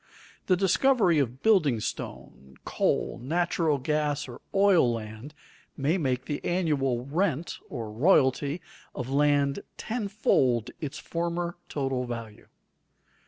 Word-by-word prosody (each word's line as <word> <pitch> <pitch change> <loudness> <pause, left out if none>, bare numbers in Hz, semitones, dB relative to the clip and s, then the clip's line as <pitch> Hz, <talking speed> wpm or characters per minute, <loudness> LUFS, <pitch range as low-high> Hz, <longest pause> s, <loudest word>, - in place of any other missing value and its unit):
The 185 - +4
discovery 195 - +3
of 130 -1 -2
building 160 - +4
stone, 65 -9 -7
coal, - - 0
natural 165 +1 +1
gas, 150 +1 -1
or 120 -1 -10
oil 195 -10 +4
land 115 +5 -7 0.4
may 150 +7 +1
make 130 -4 -1
the 145 - -4
annual 140 -9 0
rent 165 +1 -1
(or 115 -6 -5
royalty) 140 - +2 0.3
of 125 +1 -4
land 140 -1 +2 0.2
tenfold 195 - +1
its 145 -3 -4
former 170 +1 -3
total 135 -3 -2
value. 115 -3 -7
145 Hz, 115 wpm, -27 LUFS, 125-175 Hz, 0.4 s, The